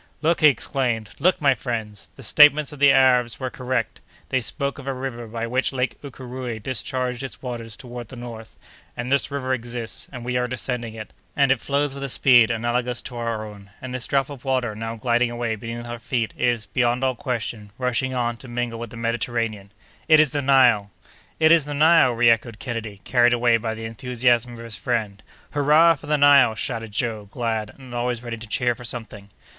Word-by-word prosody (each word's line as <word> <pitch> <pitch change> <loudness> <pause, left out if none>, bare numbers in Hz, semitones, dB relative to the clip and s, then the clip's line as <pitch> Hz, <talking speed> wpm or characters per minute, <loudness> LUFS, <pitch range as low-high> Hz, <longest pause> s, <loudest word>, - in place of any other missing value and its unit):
"Look!" 165 +2 +2
he 155 - +8
exclaimed, 120 -6 0
"look, 185 +1 +3
my 140 -2 +5
friends! 110 -5 -5
the 135 - -12
statements 150 +4 +5
of 150 - -10
the 145 -1 +7
Arabs 125 -3 +3
were 130 -2 -3
correct! 125 -2 -3 0.3
They 130 - +1
spoke 140 +4 -3
of 140 - -10
a 135 - -1
river 125 -3 -5
by 115 +1 -4
which 125 +3 0
Lake 130 -1 -2
Ukéréoué 125 -4 -7
discharged 125 0 -2
its 135 0 -8
waters 115 -4 -6
toward 120 -3 -8
the 130 - -11
north, 115 -2 -9 0.4
and 120 +2 -4
this 140 0 +2
river 135 -2 -2
exists, 120 -2 -5
and 125 -3 -8
we 125 0 -1
are 125 0 0
descending 125 -2 -3
it, 110 -1 -9 0.2
and 140 -2 +3
it 135 - +1
flows 140 0 0
with 140 - -8
a 140 - -3
speed 120 -3 +5
analogous 120 +1 -1
to 125 - -8
our 115 -2 -3
own! 100 -2 -12
And 130 -1 -7
this 125 -1 -3
drop 135 0 0
of 135 -3 -10
water 130 -4 0
now 115 +1 -5
gliding 120 +1 +1
away 120 -1 -2
beneath 115 +2 -7
our 120 0 -6
feet 115 0 -2
is, 120 -3 0
beyond 125 0 0
all 130 -1 +2
question, 115 -4 -4
rushing 130 +1 -1
on, 120 -1 -1
to 130 - -12
mingle 120 -1 -3
with 120 -1 -6
the 115 - -10
Mediterranean! 115 -3 -2 0.4
It 155 -1 +7
is 155 -4 +4
the 145 - -1
Nile!" 125 -7 +4 0.5
"It 160 0 +5
is 165 -4 +5
the 145 0 -4
Nile!" 155 -4 +5
reëchoed 115 -1 +3
Kennedy, 115 -5 -6
carried 120 -1 +3
away 120 -1 +3
by 110 0 -3
the 110 0 -7
enthusiasm 120 +1 0
of 115 0 -9
his 115 -2 -4
friend. 110 -5 -2 0.3
"Hurrah 150 +4 +5
for 145 -1 -11
the 150 0 +2
Nile!" 140 -5 +6
shouted 115 0 -4
Joe, 110 -1 -3
glad, 110 -2 -3
and 130 -3 -12
always 120 0 -2
ready 120 -1 -5
to 115 0 -10
cheer 120 +3 +1
for 120 - -12
something. 110 -4 -6
120 Hz, 205 wpm, -23 LUFS, 115-130 Hz, 0.5 s, he